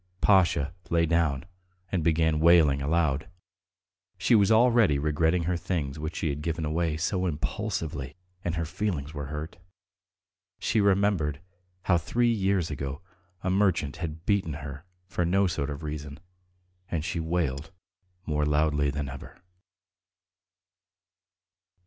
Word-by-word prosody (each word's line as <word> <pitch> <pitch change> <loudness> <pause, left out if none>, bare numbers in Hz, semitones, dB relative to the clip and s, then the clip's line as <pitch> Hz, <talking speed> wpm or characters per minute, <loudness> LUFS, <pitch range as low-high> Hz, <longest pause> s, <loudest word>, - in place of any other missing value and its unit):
Pasha 85 -6 +3 0.2
lay 85 0 +3
down 80 -4 +1 0.5
and 90 -4 0
began 80 -1 +2
wailing 80 -4 +5
aloud. 75 -1 +1 0.9
She - - +2
was 105 -2 +5
already 115 - +5
regretting 80 +4 +1
her 90 +2 0
things 85 -5 -3
which 80 +2 -4
she 80 - -1
had 70 +1 -3
given 80 0 -2
away 80 0 0
so 90 +3 0
impulsively, 80 -4 -3 0.3
and 85 -1 -1
her 85 -1 -1
feelings 85 -4 -3
were 75 -2 -5
hurt. 75 +3 -6 1.0
She 110 - +1
remembered 95 -8 +2 0.4
how 85 -3 +3
three 120 +8 +1
years 95 -5 0
ago 70 +2 -5 0.4
a 95 - 0
merchant 95 -7 +1
had 80 0 -6
beaten 100 -7 +1
her 70 +1 -7 0.2
for 90 -1 -2
no 95 +4 +3
sort 80 -5 -1
of 70 +2 -6
reason, 75 -1 -6 0.7
and 80 -2 -2
she 90 -1 -2
wailed 80 -4 -1 0.6
more 75 -1 0
loudly 75 -1 +2
than 70 0 -3
ever. 65 0 -9
80 Hz, 130 wpm, -27 LUFS, 75-90 Hz, 1.0 s, wailing